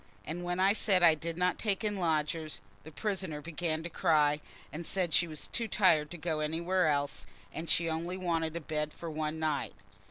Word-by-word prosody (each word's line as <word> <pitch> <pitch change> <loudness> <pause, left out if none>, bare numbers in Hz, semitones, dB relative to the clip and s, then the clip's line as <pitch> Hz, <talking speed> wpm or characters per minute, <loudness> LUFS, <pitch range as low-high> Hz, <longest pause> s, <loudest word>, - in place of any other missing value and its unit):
And 175 +3 -4
when 175 +1 -2
I 195 +2 +5
said 195 -4 +3
I 165 -2 +8
didn't 170 +3 -1
take 205 -1 0
in 210 -1 0
lodgers, 160 -2 -1 0.2
the 160 - -9
prisoner 185 -4 -2
began 160 0 -3
to 170 - -4
cry, 150 -2 +3 0.3
and 165 +3 -4
said 175 -1 0
she 170 +2 +4
was 155 -2 -7
too 230 - -1
tired 170 -8 +4
to 175 - -7
go 160 -1 -2
anywhere 170 +3 +1
else, 145 -2 0 0.3
and 160 0 -5
she 165 +2 +3
only 165 +3 -2
wanted 165 -3 -1
a 170 - -3
bed 150 0 -2
for 165 -1 -6
one 155 0 -2
night. 155 -3 -1
165 Hz, 195 wpm, -31 LUFS, 155-180 Hz, 0.3 s, I